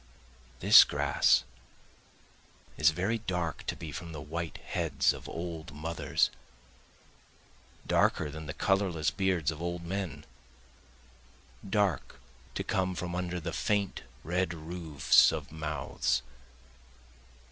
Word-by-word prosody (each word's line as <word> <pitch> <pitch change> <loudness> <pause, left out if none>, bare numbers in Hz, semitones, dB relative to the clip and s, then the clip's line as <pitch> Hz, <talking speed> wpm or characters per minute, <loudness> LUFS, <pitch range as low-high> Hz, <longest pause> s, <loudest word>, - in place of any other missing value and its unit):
This - - +10
grass - - +3 1.3
is 75 +1 +5
very 95 +8 -1
dark 90 -7 -3
to - - -1
be 80 - -7
from 85 +3 -7
the 80 - -6
white 80 +3 -5
heads - - 0
of - - -9
old 80 -3 -6
mothers, 80 +2 0 1.5
Darker 75 -3 +2
than 80 +1 -8
the 80 - -5
colorless 95 -6 +1
beards 95 -5 +1
of 80 +1 -8
old 85 0 -3
men, 85 -5 -4 1.4
Dark 100 -2 0 0.4
to - - -2
come 95 -1 0
from 90 0 -4
under 90 0 -2
the 85 0 -5
faint 100 -2 0 0.2
red 90 0 -1
roofs 80 -4 +3
of - - -5
mouths. 75 -4 -1
85 Hz, 115 wpm, -30 LUFS, 80-90 Hz, 1.5 s, This